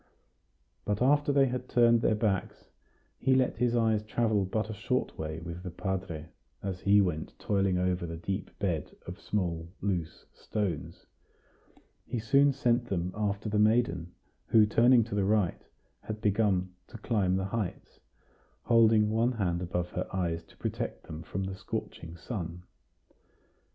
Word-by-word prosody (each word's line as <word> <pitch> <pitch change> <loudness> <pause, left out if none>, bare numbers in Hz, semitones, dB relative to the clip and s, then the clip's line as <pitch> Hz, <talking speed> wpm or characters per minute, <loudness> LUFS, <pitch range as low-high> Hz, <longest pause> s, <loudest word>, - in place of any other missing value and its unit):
But 105 0 -1
after 145 +3 +3
they 140 -1 +5
had 125 0 -3
turned 120 -1 +5
their 110 - +3
backs, 105 -3 -2 0.5
he 130 -1 +3
let 130 -1 +2
his 120 0 +1
eyes 110 -2 +2
travel 110 -2 +1
but 110 +3 -1
a 110 - -5
short 125 +5 -1
way 80 0 -4
with 85 +1 -7
the 90 - -5
padre, 90 -3 -4 0.3
as 95 -2 -3
he 100 +2 +5
went 85 -5 -2
toiling 95 -2 +1
over 90 -1 0
the 85 0 -5
deep 95 +3 -3
bed 85 -7 -2
of 90 - -8
small, 85 -5 -2
loose 90 -5 -3
stones; 105 -5 -4 1.0
he 125 - -3
soon 140 +6 +4
sent 120 -3 +1
them 90 -3 -2
after 105 0 -2
the 105 0 +1
maiden, 105 -6 +2 0.3
who, 110 -1 +6
turning 120 +3 +5
to 110 - -8
the 100 -1 +1
right, 100 -3 +1 0.3
had 110 0 -6
begun 100 -3 +1
to 115 - -10
climb 105 -5 +1
the 95 0 -1
heights, 100 -1 -4 0.6
holding 110 -2 +4
one 115 +3 +2
hand 90 -6 -1
above 90 0 -2
her 90 - -3
eyes 85 -3 -1
to - - -22
protect - - -4
them 80 0 -8
from 95 +3 -4
the 95 0 -3
scorching 85 -2 -6
sun. 90 -3 -5
100 Hz, 155 wpm, -30 LUFS, 90-115 Hz, 1.0 s, who